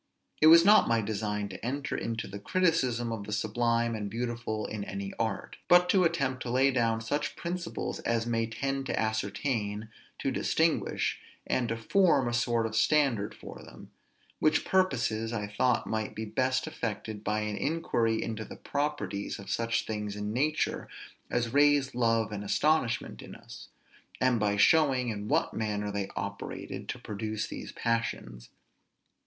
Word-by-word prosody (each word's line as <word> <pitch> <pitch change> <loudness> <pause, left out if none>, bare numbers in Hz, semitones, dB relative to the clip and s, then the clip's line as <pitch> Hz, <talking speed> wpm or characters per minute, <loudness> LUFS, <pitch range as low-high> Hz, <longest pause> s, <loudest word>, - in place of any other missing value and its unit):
It 155 - +7
was 165 +1 +9
not 210 +1 +7
my 115 -1 +3
design 105 -1 -2
to 95 0 -9
enter 140 +4 -2
into 115 -1 -3
the 100 - -7
criticism 130 - +1
of 105 -3 -4
the - - -6
sublime 115 +2 +1
and 105 -2 -3
beautiful 115 -1 -3
in 105 -2 -4
any 100 0 -5
art, - - -2
but 180 0 +6
to 185 -1 +4
attempt 135 -6 0
to 125 - -4
lay 130 +3 +3
down 115 -3 +1
such 145 +7 -2
principles 175 0 -4
as 115 -1 0
may 115 -1 0
tend 135 +4 -3
to - - -1
ascertain, 110 0 -2 0.3
to - - -1
distinguish, - - +1 0.3
and 120 -3 0
to 115 - -1
form 140 - +3
a 120 - -1
sort 120 -1 +1
of 110 0 -3
standard 120 -4 +2
for - - -10
them; - - -13 0.5
which 155 0 +2
purposes 115 -12 +1
I 105 -3 -2
thought 115 +4 +1
might 110 -1 -3
be 110 - -4
best 130 +4 0
effected 110 -8 -4
by 105 +1 0
an 105 -1 -2
inquiry 120 -6 0
into 110 -1 -4
the - - -9
properties 145 -8 -3
of 100 - -8
such 115 0 0
things 105 -2 -4
in 105 +1 -3
nature, 150 +5 0 0.4
as 120 -1 -1
raise 145 -1 +4
love 115 -3 +1
and 105 -1 -4
astonishment 130 +2 +1
in - - -10
us; - - -12 0.5
and 130 -2 +3
by 105 -1 +1
showing 130 0 +4
in 105 -1 -4
what - - +1
manner 105 -2 -2
they 100 -1 -3
operated 100 +2 -5
to - - -3
produce 110 +1 -4
these - - -7
passions. 115 - -2
115 Hz, 165 wpm, -29 LUFS, 105-135 Hz, 0.5 s, was